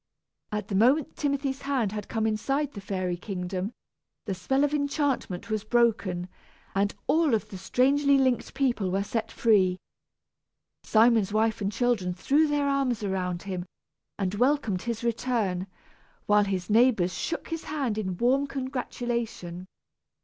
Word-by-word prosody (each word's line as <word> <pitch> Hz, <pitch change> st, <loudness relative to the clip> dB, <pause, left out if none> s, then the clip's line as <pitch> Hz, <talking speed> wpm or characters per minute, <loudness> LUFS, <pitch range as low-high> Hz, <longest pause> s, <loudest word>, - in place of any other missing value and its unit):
At 210 Hz, -1 st, -3 dB
the -, -, -3 dB
moment 255 Hz, +9 st, +3 dB
Timothy's 275 Hz, -2 st, -1 dB
hand 265 Hz, -7 st, 0 dB
had 210 Hz, 0 st, -5 dB
come 220 Hz, -1 st, -1 dB
inside 270 Hz, +7 st, 0 dB
the 200 Hz, -, -7 dB
fairy 185 Hz, -3 st, -2 dB
kingdom, 185 Hz, +1 st, -4 dB, 0.5 s
the 200 Hz, -, -2 dB
spell 265 Hz, +10 st, 0 dB
of 290 Hz, 0 st, +1 dB
enchantment 280 Hz, -, -1 dB
was 215 Hz, -1 st, -1 dB
broken, 215 Hz, -6 st, +1 dB, 0.5 s
and 200 Hz, +1 st, +1 dB
all 315 Hz, -6 st, +3 dB
of 215 Hz, -, -3 dB
the 195 Hz, -, -7 dB
strangely 280 Hz, +7 st, +3 dB
linked 260 Hz, -2 st, +1 dB
people 245 Hz, -8 st, +1 dB
were 195 Hz, +2 st, 0 dB
set 220 Hz, +2 st, -3 dB
free. 190 Hz, -6 st, +3 dB, 1.0 s
Simon's 220 Hz, -2 st, +4 dB
wife 220 Hz, 0 st, +1 dB
and 200 Hz, 0 st, 0 dB
children 210 Hz, -6 st, 0 dB
threw 290 Hz, -, +3 dB
their 290 Hz, -1 st, +1 dB
arms 270 Hz, -5 st, 0 dB
around 180 Hz, -3 st, -2 dB
him, 185 Hz, -2 st, -4 dB, 0.5 s
and 190 Hz, -2 st, -1 dB
welcomed 245 Hz, -4 st, +1 dB
his 235 Hz, -1 st, -4 dB
return, 225 Hz, -6 st, -1 dB, 0.6 s
while 210 Hz, 0 st, +4 dB
his 190 Hz, -2 st, -2 dB
neighbors 220 Hz, -5 st, +3 dB
shook 335 Hz, -, -3 dB
his 330 Hz, -1 st, -4 dB
hand 275 Hz, -7 st, -1 dB
in 185 Hz, -4 st, -3 dB
warm 265 Hz, +5 st, +2 dB
congratulation. 240 Hz, -9 st, -4 dB
225 Hz, 145 wpm, -27 LUFS, 195-270 Hz, 1.0 s, Simon's